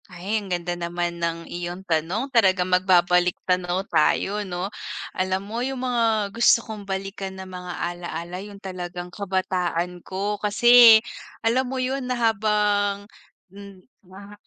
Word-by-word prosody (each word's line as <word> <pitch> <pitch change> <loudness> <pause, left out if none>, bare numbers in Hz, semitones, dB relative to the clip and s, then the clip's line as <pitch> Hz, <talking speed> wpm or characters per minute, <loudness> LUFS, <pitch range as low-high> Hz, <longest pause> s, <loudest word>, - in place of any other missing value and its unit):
Ay, 190 +5 -3
ang 200 - -10
ganda 175 -1 -2
naman 175 0 -3
ng 165 0 -2
iyong 175 +2 -6
tanong, 180 - -1
talagang 190 -6 +4
magbabalik-tanaw 180 0 +2
tayo 195 +5 +1
'no? 185 0 -4 0.4
Alam 185 0 -1
mo, 225 +4 -4
yung 260 0 -3
mga 225 -5 +1
gusto 230 0 +4
kong 210 -3 -8
balikan 195 0 -5
na 190 - -7
mga 180 -1 -7
alaala 175 +1 -5
yung 205 0 -10
talagang 180 -2 -7
kabataan 180 -3 -2
ko. 200 +3 -3
Kasi 235 +2 +8 0.5
alam 250 +3 +2
mo 265 - -4
yun 255 0 -2
na 250 - -1
habang, 210 -3 +1 0.5
hmm, 200 -2 -13 0.2
na 200 +2 -13
190 Hz, 135 wpm, -24 LUFS, 180-210 Hz, 0.5 s, Kasi